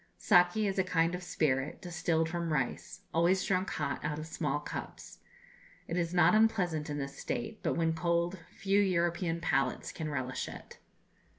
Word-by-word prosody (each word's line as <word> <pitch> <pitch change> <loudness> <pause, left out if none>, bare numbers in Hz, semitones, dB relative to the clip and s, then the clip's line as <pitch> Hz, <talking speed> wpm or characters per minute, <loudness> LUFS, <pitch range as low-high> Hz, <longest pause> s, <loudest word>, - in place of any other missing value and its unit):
Saki 175 - +4
is 195 -1 0
a - - +4
kind 170 -2 +1
of 180 - -3
spirit, 145 -5 0
distilled 165 -2 0
from 170 0 -2
rice, 140 +6 -2
always 175 +3 +3
drunk 185 0 +1
hot - - -2
out 150 -1 -2
of 155 - -5
small 160 - -2
cups. - - -7 0.7
It 170 - -3
is 170 -2 0
not 175 -1 +5
unpleasant 190 -9 +2
in 145 - -3
this 140 -1 -5
state, 120 - -4
but - - 0
when 165 -1 +2
cold 170 +2 0
few 195 +1 +1
European 170 -2 +1
palates 135 -5 0
can 155 -1 -4
relish 130 -3 -3
it. - - -11
170 Hz, 170 wpm, -31 LUFS, 155-180 Hz, 0.7 s, not